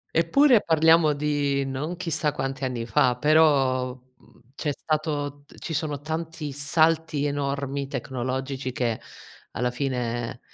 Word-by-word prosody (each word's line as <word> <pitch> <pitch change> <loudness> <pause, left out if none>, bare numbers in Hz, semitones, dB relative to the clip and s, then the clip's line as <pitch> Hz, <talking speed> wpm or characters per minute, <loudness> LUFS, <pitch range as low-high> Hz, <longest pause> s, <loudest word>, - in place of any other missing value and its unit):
Eppure, 235 - +5
parliamo 160 -1 +5
di 145 -1 0
non 145 +6 -4
chissà 165 -4 -1
quanti 135 -1 -4
anni 125 -3 -2
fa, 125 +1 +2
però, 135 -4 +3
mhmm, 130 -1 -23
c'è 150 - -2
stato 145 -1 -2 0.2
ci 165 - -5
sono 150 -2 -2
tanti 160 0 -5
salti 155 +1 +1
enormi 140 -1 -2
tecnologici, 130 0 -3
che 120 -3 -2 0.5
alla 125 - -1
fine 120 -3 -3
140 Hz, 120 wpm, -25 LUFS, 130-155 Hz, 0.5 s, Eppure